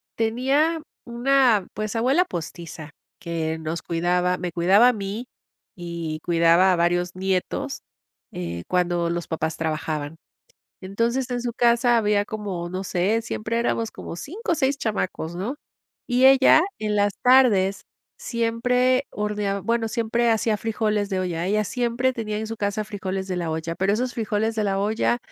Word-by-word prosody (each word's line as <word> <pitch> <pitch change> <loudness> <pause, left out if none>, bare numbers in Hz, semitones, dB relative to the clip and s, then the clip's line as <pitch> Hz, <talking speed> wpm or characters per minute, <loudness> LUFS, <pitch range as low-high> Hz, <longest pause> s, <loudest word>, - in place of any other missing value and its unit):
Tenía 270 +8 +1 0.2
una, 240 -4 +3
pues, 215 +1 -3
abuela 265 +10 +3
postiza 165 - -7 0.3
que 160 -1 -3
nos 160 +1 -4
cuidaba, 180 +2 0
me 175 -2 -4
cuidaba 195 +8 +5
a 250 - +4
mí 205 +2 -5 0.5
y 170 -3 -5
cuidaba 170 +2 +4
a 180 - +2
varios 175 +1 +1
nietos, 185 0 -2 0.5
eh, 85 -1 -5
cuando 175 -1 +1
los 170 0 -3
papás 160 -1 -2
trabajaban. 155 -1 -3 0.7
Entonces 230 +7 -1
en 245 -1 -2
su 240 -1 -2
casa 240 +1 +3
había 210 -2 +2
como, 200 -5 -5
no 185 +2 -4
sé, 195 +5 0
siempre 230 0 -3
éramos 230 -1 0
como - - -8
5 345 - -4
o - - +3
6 280 -3 0
chamacos, 185 -8 -3
¿no? 205 +11 -4 0.5
Y 250 +1 +4
ella 270 +3 +7 0.2
en 215 -1 -1
las 205 -1 +2
tardes 220 -7 +4 0.3
siempre, 250 +3 +1
hornea 210 -1 -2
bueno, 230 -1 0
siempre 235 +1 +1
hacía 220 -1 +1
frijoles 210 -1 -1
de 190 -2 -1
olla. 175 -2 -2
Ella 210 +3 +1
siempre 245 +3 0
tenía 215 -3 -3
en 220 - -4
su 225 +1 -5
casa 205 +1 -2
frijoles 195 -3 -4
de 190 - -3
la 170 -2 -2
olla, 160 +1 -3
pero 190 +3 +1
esos 245 +4 -1
frijoles 220 0 -1
de 220 - 0
la 195 -1 0
olla 215 +4 +1
210 Hz, 160 wpm, -24 LUFS, 175-235 Hz, 0.7 s, ella